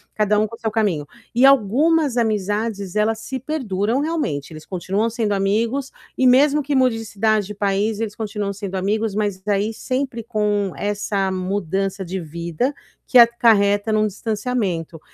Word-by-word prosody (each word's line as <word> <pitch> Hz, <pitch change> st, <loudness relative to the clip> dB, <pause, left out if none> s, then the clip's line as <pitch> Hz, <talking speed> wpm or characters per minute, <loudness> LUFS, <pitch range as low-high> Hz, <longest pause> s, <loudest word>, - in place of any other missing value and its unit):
cada 210 Hz, -1 st, +2 dB
um 215 Hz, -, +2 dB
com 230 Hz, -, -9 dB
o -, -, -21 dB
seu 225 Hz, -, -1 dB
caminho. 195 Hz, -10 st, 0 dB, 0.3 s
E 245 Hz, +3 st, +4 dB
algumas 275 Hz, +4 st, +3 dB
amizades, 210 Hz, -2 st, -1 dB
elas 220 Hz, +1 st, +1 dB
se 260 Hz, +3 st, -5 dB
perduram, 240 Hz, -4 st, -1 dB
realmente, 295 Hz, -, -2 dB
eles 155 Hz, 0 st, -10 dB
continuam 195 Hz, +4 st, -1 dB
sendo 225 Hz, -2 st, -1 dB
amigos 225 Hz, +7 st, 0 dB, 0.3 s
e 260 Hz, -, +4 dB
mesmo 285 Hz, +4 st, +5 dB
que 285 Hz, 0 st, -2 dB
mude 255 Hz, -3 st, +3 dB
de 225 Hz, -, -7 dB
cidade, 215 Hz, -1 st, 0 dB
de 210 Hz, -, -7 dB
país, 205 Hz, +2 st, 0 dB
eles 220 Hz, -2 st, -3 dB
continuam 210 Hz, -2 st, -3 dB
sendo 195 Hz, -1 st, -6 dB
amigos, 205 Hz, +2 st, -1 dB
mas 205 Hz, -3 st, -1 dB
daí 205 Hz, +2 st, 0 dB
sempre 255 Hz, 0 st, -3 dB
com 210 Hz, -3 st, 0 dB
essa 205 Hz, -1 st, -1 dB
mudança 190 Hz, +1 st, -2 dB
de 185 Hz, +2 st, -4 dB
vida 170 Hz, -, -3 dB, 0.3 s
que 255 Hz, -, +4 dB
acarreta 220 Hz, -3 st, +5 dB
num 215 Hz, 0 st, +3 dB
distanciamento. 205 Hz, -6 st, -3 dB
210 Hz, 165 wpm, -21 LUFS, 195-235 Hz, 0.3 s, mesmo